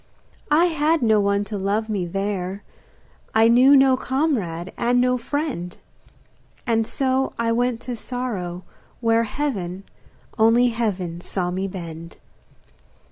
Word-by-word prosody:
I 310 +4 +5
had 320 -2 +1
no 220 -2 +4
one 200 0 +1
to 205 0 -5
love 205 +3 -1
me 200 -5 -2
there, 195 +1 -3 0.7
I 220 +1 +6
knew 255 +4 +6
no 265 -1 +5
comrade 245 - -2
and 245 +1 +1
no 250 0 +3
friend; 250 - -3 0.9
And 225 -3 +1
so 265 0 0
I 230 0 0
went 240 0 0
to 245 - -5
sorrow 210 -8 -4 0.4
where 230 -1 +2
Heaven, 200 -9 -3 0.6
only 230 +3 +5
heaven 190 -7 -2
saw 180 -1 -3
me 190 +2 -2
bend. 170 -3 -8
225 Hz, 130 wpm, -22 LUFS, 190-250 Hz, 0.9 s, I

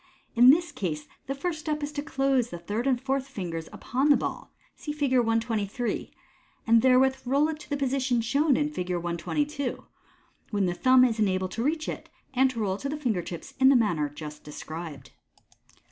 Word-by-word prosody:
In 245 +1 +7
this 340 +5 +4
case 155 -6 -4 0.2
the 275 - -2
first 315 +3 -3
step 300 -1 -3
is 290 - -3
to 290 -1 -3
close 270 -4 +1
the 175 - -6
third 210 +9 -3
and 255 -3 +2
fourth 270 +1 -1
fingers 170 -10 -5
upon 265 +5 -1
the 290 - +7
ball - - -5 0.2
(see 300 - -6
Fig. 285 -3 0
123), 225 -1 -1 0.6
and 230 0 +5
therewith 260 +1 +4
roll 275 +4 +2
it 310 -1 -4
to 300 - -13
the 290 - -1
position 265 -2 0
shown 280 +5 +2
in 300 0 0
Fig. 180 -11 -4
122, 245 - -2 0.6
when 205 -3 0
the 175 - 0
thumb 255 +6 +5
is 230 -3 -1
enabled 185 -3 +1
to 230 - -3
reach 310 +3 -1
it, - - -6 0.2
and 265 +1 +4
to 245 -3 -5
roll 195 -3 0
it 195 - -5
to 275 - -3
the 300 - -3
finger 235 -11 0
tips 170 -1 -8
in 265 0 +7
the 275 - +6
manner 175 -11 +2
just 150 0 -9
de 150 - -10
scribed. 160 -1 -8
250 Hz, 200 wpm, -27 LUFS, 190-275 Hz, 0.6 s, In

